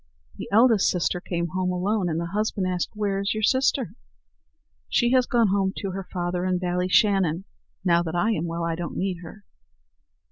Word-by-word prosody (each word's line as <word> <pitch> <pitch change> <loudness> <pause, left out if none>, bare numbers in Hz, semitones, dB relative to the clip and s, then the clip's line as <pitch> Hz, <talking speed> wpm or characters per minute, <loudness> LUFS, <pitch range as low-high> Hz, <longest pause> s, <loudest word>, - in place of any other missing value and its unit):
The - - -7
eldest 225 -1 +5
sister 180 0 -1
came 170 -1 -3
home 185 +1 -1
alone, 185 +1 0
and 160 0 -1
the 170 0 -4
husband 210 -2 -1
asked, 180 -1 -1
"Where 200 -2 -1
is 200 +2 -1
your 215 - -3
sister?" 260 -4 +2 1.0
"She 240 -1 +2
has 255 -1 +3
gone 235 -4 +3
home 195 0 +1
to 195 -3 -3
her 190 0 -6
father 175 0 -2
in 185 -1 +1
Ballyshannon; 180 0 +2 0.4
now 170 -1 +4
that 165 -1 -4
I 210 +6 +2
am 170 -6 -1
well, 170 0 -3
I 165 0 -1
don't 170 +1 -5
need 185 -2 -2
her." 190 +5 -11
185 Hz, 185 wpm, -25 LUFS, 175-210 Hz, 1.0 s, eldest